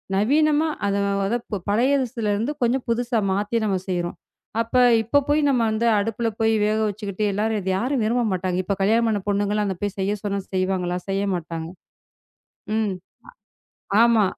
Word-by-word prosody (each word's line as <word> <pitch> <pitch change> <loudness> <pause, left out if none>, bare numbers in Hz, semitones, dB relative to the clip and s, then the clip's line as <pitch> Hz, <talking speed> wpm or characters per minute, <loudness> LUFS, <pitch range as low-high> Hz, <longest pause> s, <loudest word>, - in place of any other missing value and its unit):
நவீனமா 300 +9 +3 0.2
அத, 200 - +1 0.3
அத 200 - -1
இப்ப 205 - -4
பழையஸ்துல 245 0 +1
இருந்து 225 +7 -1
கொஞ்சம் 245 +2 +1
புதுசா 235 0 +1
மாத்தி 205 +4 0
நாம 195 -3 +1
செய்யுறோம். 175 -1 -2 0.4
அப்ப, 230 +2 -5 0.3
இப்ப 285 +6 +2
போய் 295 +1 +3
நம்ம 250 -4 +2
வந்து 220 +2 0
அடுப்புல 225 +2 -1
போய் 225 0 +3
வேக 215 +1 +1
வச்சிக்கிட்டு 205 0 -4
எல்லாரும் 215 +2 0
இத 190 - -3
யாரும் 250 +3 0
விரும்ப 240 +2 +1
மாட்டாங்க. 185 -1 -1
இப்ப 200 +2 -1
கல்யாணம் 225 +4 +3
ஆன 205 - -1
பொண்ணுங்கலாம் 205 +1 +1
அங்க 190 - -2
போய் 205 -1 -2
செய்யச் 200 +1 -1
சொன்னா 200 -1 -1
செய்வாங்களா! 185 -1 0
செய்யமாட்டாங்க. 175 -5 -2 1.1
ம் 215 -3 0 1.1
அ - - +6
ஆமா. 230 -3 +4
210 Hz, 160 wpm, -23 LUFS, 195-235 Hz, 1.1 s, அ